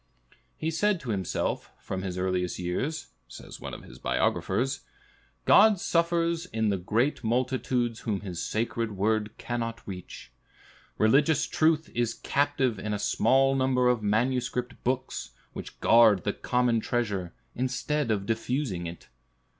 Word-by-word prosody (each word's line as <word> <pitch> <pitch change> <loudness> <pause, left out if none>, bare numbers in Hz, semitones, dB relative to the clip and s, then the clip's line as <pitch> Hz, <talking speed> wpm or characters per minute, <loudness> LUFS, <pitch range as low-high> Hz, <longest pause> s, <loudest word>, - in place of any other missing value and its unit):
"He 160 - -2
said 205 +3 +1
to 125 - -4
himself, 95 -4 -2
from 95 - -5
his 95 -1 -4
earliest 90 -1 -1
years," 90 - -3 0.2
says - - -11
one - - -6
of - - -11
his - - -13
biographers, 135 +3 0 0.7
"God 215 -4 +6
suffers 170 0 +1
in 110 -6 0
the 100 - +1
great 115 +10 0
multitudes 120 0 0
whom 105 -4 -2
his 90 -4 -5
sacred 115 0 -2
word 105 +1 0
cannot 115 -1 -4
reach. 90 -9 -8 0.7
Religious 145 +7 +4
truth 160 0 +1
is 120 -1 0
captive 140 -6 0
in 105 +1 -2
a - - -1
small 135 +6 +3
number 130 -2 +2
of 125 -2 +2
manuscript 125 +3 -1
books, 125 - -2 0.2
which - - -8
guard 110 -6 +6
the - - 0
common 125 -2 +1
treasure, 105 -7 -2 0.2
instead 130 +2 -1
of 100 -3 0
diffusing 115 -4 -2
it. 85 +1 -9
120 Hz, 140 wpm, -28 LUFS, 105-135 Hz, 0.7 s, God